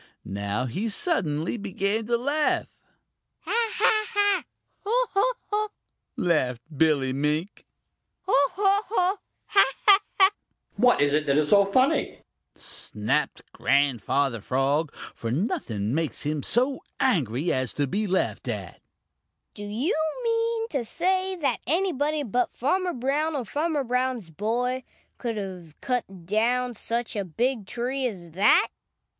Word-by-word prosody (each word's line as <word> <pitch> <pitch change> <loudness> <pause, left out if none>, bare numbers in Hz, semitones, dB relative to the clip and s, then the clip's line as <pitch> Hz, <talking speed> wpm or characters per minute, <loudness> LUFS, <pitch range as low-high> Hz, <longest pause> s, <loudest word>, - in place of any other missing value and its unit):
Now 100 +5 -2
he 195 - -2
suddenly 175 - 0
began 205 +2 -2
to 235 0 +2
laugh. 290 +5 -1 0.6
"Ha, - - -4 0.2
ha, 430 -1 +3
ha! 410 -3 +2 0.4
Ho, 485 +5 +2
ho, 450 +6 +3 0.2
ho!" 425 0 0 0.5
laughed 130 -9 +1
Billy 140 -3 +2
Mink. 150 +7 -2 0.6
"Ho, 375 - -2 0.2
ho, 400 +1 +3
ho! 380 -2 +2 0.3
Ha, 395 - +5 0.2
ha, 400 -1 +8 0.2
ha!" 380 0 +7 0.4
"What 245 -4 +4
is 145 0 +3
it 150 0 +1
that 140 0 +3
is 150 -1 +2
so 200 -1 +6
funny?" 255 +7 +1 0.3
snapped - - -2
Grandfather 135 -2 +1
Frog, 140 +6 +1 0.2
for 115 - -5
nothing 115 - -1
makes 160 0 -1
him 150 0 -1
so 255 - +2 0.2
angry 155 - +1
as 130 -1 0
to 145 - +1
be 205 +10 -1
laughed 185 0 -1
at. - - -5 0.7
"Do 205 - -11
you 225 - -1 0.3
mean 460 0 0
to 275 -5 -1
say 370 - 0
that 300 -6 0
anybody 310 -2 +1
but 245 0 -1
Farmer 360 +7 +1
Brown 290 +5 0
or 260 -4 -2
Farmer 300 - -1
Brown's 250 -6 -1
boy 240 +8 -1 0.4
could 230 -2 -3
have 180 -6 -7
cut 195 -9 -3
down 240 +5 +1
such 230 +1 -3
a 205 - -1
big 225 +4 -1
tree 255 +4 -1
as 175 -7 -8
that?" 195 +6 +4
230 Hz, 135 wpm, -26 LUFS, -, 0.7 s, ha